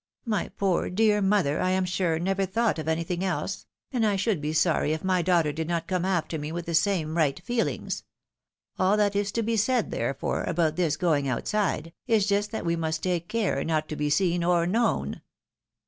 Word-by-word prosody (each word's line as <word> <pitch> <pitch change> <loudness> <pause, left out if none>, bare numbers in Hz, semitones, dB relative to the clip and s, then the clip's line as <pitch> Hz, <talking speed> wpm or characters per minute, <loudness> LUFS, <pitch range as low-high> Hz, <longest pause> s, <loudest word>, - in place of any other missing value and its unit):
My 215 -3 -1
poor, 190 -3 +1
dear 210 +2 +3
mother, 195 -7 +2
I 185 - +1
am 185 0 +1
sure, 180 -3 0
never 195 +3 0
thought 220 -2 0
of 155 - -5
anything 165 +3 -1
else, 190 +1 -3 0.2
and 245 -4 0
I 210 -2 +2
should 195 -4 0
be 150 +1 -2
sorry 160 -1 +2
if 160 - -4
my 185 -1 +2
daughter 170 -4 +2
did 160 +1 -3
not 170 -1 -1
come 180 0 -1
after 170 -4 -1
me 150 +1 -5
with 170 0 -4
the 170 - -4
same 160 -2 +1
right 155 -2 +1
feehngs. 240 -1 -1 0.8
All 190 +3 +3
that 205 -1 +2
is 205 0 0
to 230 - 0
be 225 +1 0
said, 235 +2 +1
therefore, 130 +4 -2
about 165 -2 +1
this 160 -4 +1
• - - -29
going 150 -6 +2
outside, 165 - -1
is 220 -4 +3
just 205 0 +1
that 220 -3 -5
we 170 0 +1
must 160 -1 -2
take 175 -2 -1
care 210 -11 0
not 155 -1 0
to 155 - -3
be 150 0 -1
seen 175 +2 +2
or 170 -1 +3
known." 225 +6 0
180 Hz, 210 wpm, -26 LUFS, 160-200 Hz, 0.8 s, dear